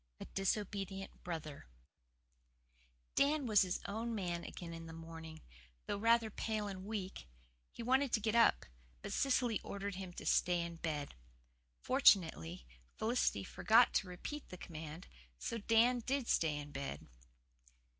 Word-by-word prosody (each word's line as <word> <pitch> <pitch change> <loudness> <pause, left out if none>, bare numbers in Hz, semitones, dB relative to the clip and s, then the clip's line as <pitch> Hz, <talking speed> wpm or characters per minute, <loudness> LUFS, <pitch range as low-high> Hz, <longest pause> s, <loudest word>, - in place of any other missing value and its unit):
A - - -6
DISOBEDIENT 195 0 -3
BROTHER 155 - -6 1.5
Dan 290 0 +3
was 215 -4 +5
his 185 -2 0
own 225 +3 -3
man 175 -4 -2
again 170 -2 -7
in 165 0 -8
the 165 - -8
morning, 165 -1 -9 0.4
though 200 - -2
rather 230 0 +4
pale 215 0 -2
and 190 -1 -6
weak; 195 - -5 0.4
he 235 - -7
wanted 260 +2 +3
to - - +4
get 215 0 0
up, 235 0 +5 0.4
but - - -4
Cecily 250 -5 +2
ordered 200 0 -4
him 185 -1 -6
to - - -8
stay 180 -1 +3
in 170 0 -5
bed. 150 -3 -3 0.7
Fortunately 160 - +4 0.3
Felicity 220 - +1
forgot 220 - +4
to 195 - +1
repeat 225 +11 -6
the 180 - -8
command, 160 0 -8 0.3
so 230 - -3
Dan 230 +3 +4
did 260 +1 -1
stay 160 -3 +2
in 145 0 -7
bed. 140 0 -5
195 Hz, 145 wpm, -36 LUFS, 165-230 Hz, 1.5 s, was